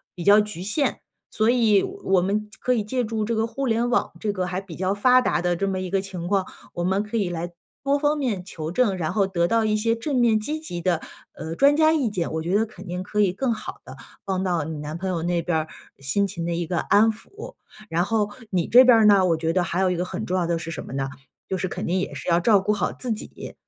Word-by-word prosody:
比 175 - -6
较 205 +3 +7
局 210 -5 -6
限， 250 +9 0 0.3
所 220 +1 +1
以 225 -5 +4
我 370 - 0
们 210 +3 -1
可 250 - +1
以 225 - 0
借 250 +4 -1
助 220 -1 -2
这 230 +1 -1
个 220 - +1
互 235 +4 -4
联 235 +1 +1
网 245 - +1
这 210 -2 -1
个 185 -2 -2
还 180 +1 -2
比 195 -4 -10
较 185 +3 0
发 250 +5 +5
达 175 - 0
的 175 0 +1
这 195 +3 -1
么 190 -1 -1
一 185 -1 -4
个 195 - +1
情 185 -3 -6
况， 195 0 +1 0.3
我 175 - -3
们 190 +3 +1
可 215 +2 -4
以 200 -5 0
来 175 0 -4 0.3
多 280 +1 +2
方 295 +1 +1
面 235 -10 -2
求 160 -3 -6
证， 200 -3 +1
然 160 -3 -2
后 200 -3 +2
得 170 -3 +1
到 230 +2 +2
一 215 -1 +1
些 230 +2 +1
正 275 +5 -3
面 235 -3 +4
积 300 +8 -3
极 175 - -6
的， 170 -2 +1 0.3
呃， 160 +1 -6
专 285 - +4
家 315 0 +5
意 275 -8 +1
见， 180 -5 -3
我 160 - -1
觉 175 +4 -1
得 220 +2 +3
肯 215 - -13
定 180 +1 -4
可 210 +2 -3
以 200 -3 +4
更 240 +6 -1
好 215 - -7
地 130 - -10 0.3
帮 190 -1 -1
到 175 -4 0
你 155 0 -5
男 150 +2 -5
朋 190 - -4
友 175 -3 -1
那 175 0 0
边 160 -1 +1
儿， 155 - -4 0.3
心 140 +10 0
情 170 -3 -4
的 - - -1
一 170 0 -2
个 170 0 -1
安 220 +6 +4
抚。 400 - -11 0.4
然 170 +2 +1
后 210 +1 0 0.2
你 180 -3 0
这 250 +2 +8
边 245 -3 +7
儿 220 - +5
呢， 200 -2 +6
我 165 -2 +2
觉 165 0 -1
得 185 - +2
还 175 +1 -1
有 185 -1 +2
一 - - 0
个 175 - -1
很 180 - -5
重 185 - -2
要 175 -2 0
的 170 - 0
是 165 0 -6
什 - - -5
么 - - -9
呢？ 135 0 -2 0.4
就 190 - -2
是 185 - -1
肯 - - -5
定 185 +2 0
也 - - -4
是 - - -8
要 170 -1 +4
照 205 +2 +4
顾 210 +2 0
好 205 - -1
自 250 -3 -4
己。 215 - -6
195 Hz, 295 characters per minute, -24 LUFS, 175-225 Hz, 0.4 s, 这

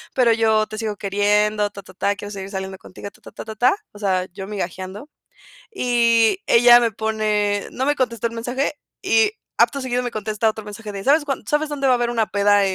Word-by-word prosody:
pero 250 -3 +4
yo 220 -1 +2
te 215 - -8
sigo 215 -1 -3
queriendo 205 +1 +1
ta, 200 - -10
ta, 185 - -15
ta. 200 +2 0
Quiero 205 0 -8
seguir 195 -1 -7
saliendo 190 -1 -5
contigo 190 +2 -10
ta, - - -23
ta, - - -13
ta, - - -8
ta, 220 0 -7
ta. 245 - +3 0.2
O 205 - -13
sea, 190 -3 0
yo 195 0 -7
migajeando 195 - -6 0.6
y 235 - +3
ella 240 +1 +7
me 235 -2 +1
pone 210 -1 -1
no 260 - -2
me 290 - +2
contestó 235 -4 -1
el 230 - -10
mensaje 245 +5 -2 0.3
y 440 -2 +3 0.3
acto 280 -1 +3
seguido 250 -1 -1
me 245 - -2
contesta 215 0 -1
otro 220 -1 -6
mensaje 210 +1 -8
de, 195 -1 -6
¿sabes 290 +4 +3
cuán? 275 -2 -3
¿Sabes 300 +1 0
dónde 285 -2 -3
va 255 - +5
a - - +4
haber 240 0 0
una 230 -2 +1
peda 205 0 +3
220 Hz, 220 wpm, -21 LUFS, 205-240 Hz, 0.6 s, ella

